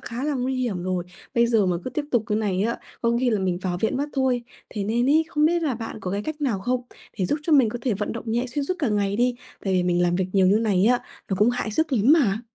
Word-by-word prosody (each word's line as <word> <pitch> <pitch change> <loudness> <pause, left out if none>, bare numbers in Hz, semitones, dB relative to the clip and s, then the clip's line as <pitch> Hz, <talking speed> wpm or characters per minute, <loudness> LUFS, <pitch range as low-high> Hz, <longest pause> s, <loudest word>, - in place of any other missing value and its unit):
khá 245 +4 -5
là 300 -1 0
nguy 260 +1 -1
hiểm 220 -9 -2
rồi. 185 -1 -2 0.3
Bây 235 0 +4
giờ 220 -5 +3
mà 180 - +1
cứ - - -3
tiếp 290 +4 -2
tục 235 -3 +2
cái 210 -1 0
này 195 -3 0
á, 235 +2 -1 0.2
có 235 0 +2
khi 250 -2 +2
là 215 - +1
mình 180 -2 0
vào 175 -2 -2
viện 220 - 0
mất 285 +2 -1
thôi. 260 -3 +1 0.3
Thế 205 -2 -3
nên 235 +4 +1
ấy, 320 +2 +4
không 300 -1 +1
biết 340 0 +1
là 280 -6 0
bạn 225 0 -6
có 180 - -4
cái 200 +1 -2
cách 310 +5 -5
nào 240 -10 0
không 250 +4 -1 0.4
để 185 - +1
giúp 295 - 0
cho 320 - 0
mình 265 -6 +6
có 240 +3 -4
thể 235 -5 +1
vận 210 +2 -3
động 230 - -6
nhẹ 240 +2 0
xuyên 275 +3 -3
suốt 365 - -1
cả 285 -7 0
ngày 205 -1 0
đi? 245 +1 +2 0.3
Tại 195 - 0
vì 180 - +3
mình 175 0 +1
làm 175 0 +2
việc 190 - 0
nhiều 190 -2 +4
như 195 +3 +5
này 215 -5 +1
nhé, 240 +4 +4 0.3
nó 190 - +1
cũng 215 +3 +5
hại 245 -3 -2
sức 310 +6 0
lắm 245 +5 +4
mà. 225 -10 +3
230 Hz, 300 wpm, -24 LUFS, 200-260 Hz, 0.4 s, mình